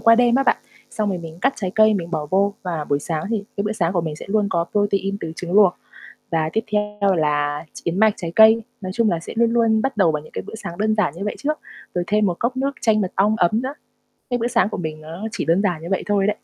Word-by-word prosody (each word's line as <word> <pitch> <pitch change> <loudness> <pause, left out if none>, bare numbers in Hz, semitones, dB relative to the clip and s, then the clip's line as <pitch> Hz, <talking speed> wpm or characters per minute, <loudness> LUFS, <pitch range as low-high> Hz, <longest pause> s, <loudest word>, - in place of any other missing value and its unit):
qua 230 0 +6
đêm 240 0 +4
á 270 - +4
bạn, - - +3 0.3
xong 210 -1 -1
rồi 185 -2 -1
mình 165 -1 -9
cắt 270 +3 +3
trái 190 -4 -3
cây 215 0 +5
mình 170 -3 -3
bỏ 155 -3 -2
vô. 200 +2 +2
Và 170 -4 -3
buổi 145 -1 0
sáng 155 +1 -3
thì 210 -3 -1
cái 200 - 0
bữa 210 - -1
sáng 175 -5 0
của 175 - +1
mình 155 -2 -4
sẽ - - -9
luôn 210 0 +2
có 170 -1 +1
protein 200 -1 +1
từ 160 -1 -5
trứng 175 -1 -5
luộc. 195 -3 +6 0.6
Và 160 -1 +1
tiếp 220 - 0
theo 210 -1 +1
là 145 0 0 0.2
yến 170 +3 -1
mạch, 220 -1 +5
trái 170 -2 -5
cây, 220 +1 +7 0.2
nói 185 -1 -4
chung 230 -1 +2
là 170 - 0
sẽ - - -8
luôn 230 0 +3
luôn 225 -2 +3
bắt 270 -2 -2
đầu 175 -5 +4
bằng 150 -1 -3
những - - -15
cái - - -3
bữa - - -7
sáng 170 -5 -7
đơn 215 +2 +1
giản 195 -9 +1
như 185 - -9
vậy 210 - -2
trước, 305 +2 -1 0.4
rồi 175 - +1
thêm 210 0 +2
một 175 -2 -1
cốc 250 +2 -1
nước 275 +1 0
chanh 215 -3 +3
mật 185 - -2
ong 205 +3 +3
ấm 215 +4 +2
nữa. 265 +2 -3 0.6
Cái 245 - +1
bữa 235 0 0
sáng 235 -4 +2
của - - -5
mình 155 -2 -4
nó 165 +7 -7
chỉ - - -2
đơn 170 +4 +2
giản 175 -6 -1
như 170 - -6
vậy 195 - 0
thôi 200 -1 +2
đấy. - - +3
200 Hz, 285 wpm, -21 LUFS, 170-220 Hz, 0.6 s, cây